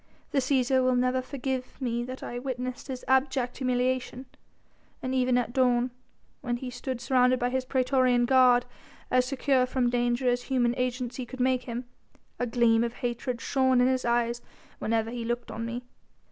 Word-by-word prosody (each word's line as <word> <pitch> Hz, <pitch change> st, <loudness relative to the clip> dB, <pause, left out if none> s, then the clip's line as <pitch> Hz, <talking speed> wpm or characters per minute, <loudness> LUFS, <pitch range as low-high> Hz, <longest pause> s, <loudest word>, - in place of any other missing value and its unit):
The 280 Hz, -, +2 dB
Cæsar 260 Hz, -1 st, +2 dB
will 255 Hz, 0 st, +3 dB
never 255 Hz, +1 st, +1 dB
forgive 260 Hz, -1 st, -4 dB
me 240 Hz, -2 st, -1 dB
that 255 Hz, +1 st, -7 dB
I 240 Hz, -, -5 dB
witnessed 255 Hz, -1 st, -5 dB
his 260 Hz, -2 st, -6 dB
abject 265 Hz, -1 st, +1 dB
humiliation. 255 Hz, 0 st, -1 dB, 0.8 s
Even 255 Hz, -1 st, +1 dB
at 240 Hz, -1 st, -1 dB
dawn, 250 Hz, -1 st, +2 dB, 0.5 s
when 240 Hz, -3 st, -2 dB
he 250 Hz, 0 st, -6 dB
stood 255 Hz, 0 st, -4 dB
surrounded 250 Hz, +1 st, +3 dB
by 245 Hz, 0 st, -1 dB
his 260 Hz, 0 st, -1 dB
praetorian 255 Hz, -2 st, +2 dB
guard, 250 Hz, -1 st, +5 dB, 0.5 s
as 250 Hz, 0 st, +3 dB
secure 265 Hz, -1 st, +2 dB
from 250 Hz, -2 st, 0 dB
danger 245 Hz, +1 st, +1 dB
as 245 Hz, 0 st, +2 dB
human 245 Hz, -3 st, +1 dB
agency 250 Hz, 0 st, -2 dB
could 260 Hz, +2 st, -9 dB
make 255 Hz, 0 st, +1 dB
him, 240 Hz, +1 st, -5 dB, 0.5 s
a 245 Hz, -, 0 dB
gleam 230 Hz, -1 st, +3 dB
of 235 Hz, 0 st, -2 dB
hatred 240 Hz, 0 st, -3 dB
shone 260 Hz, -2 st, +2 dB
in 250 Hz, -, +4 dB
his 260 Hz, -1 st, +1 dB
eyes 235 Hz, 0 st, 0 dB, 0.4 s
whenever 225 Hz, 0 st, 0 dB
he 240 Hz, -1 st, -4 dB
looked 240 Hz, 0 st, -3 dB
on 230 Hz, +1 st, -4 dB
me. 240 Hz, +1 st, -5 dB
250 Hz, 170 wpm, -28 LUFS, 240-260 Hz, 0.8 s, guard